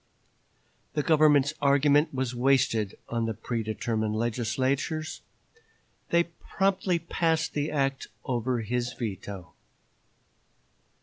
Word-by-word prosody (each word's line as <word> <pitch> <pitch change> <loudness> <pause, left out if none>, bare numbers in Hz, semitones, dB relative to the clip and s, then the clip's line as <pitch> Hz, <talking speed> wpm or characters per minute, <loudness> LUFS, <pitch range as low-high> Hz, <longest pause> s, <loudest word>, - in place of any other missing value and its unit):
The 150 - 0
Governor's 150 -2 +4
argument 145 +2 +4
was 130 -2 -2
wasted 120 -5 +2
on 115 -1 -1
the 115 - -2
predetermined 110 -1 -2
legislators. 130 +7 -1 0.9
They 170 0 +4
promptly 185 +2 -1
passed 165 -1 0
the 145 +1 -1
act 135 -2 -1 0.2
over 125 -1 -1
his 120 +2 -2
veto. 100 -5 -6
130 Hz, 90 wpm, -28 LUFS, 115-155 Hz, 0.9 s, Governor's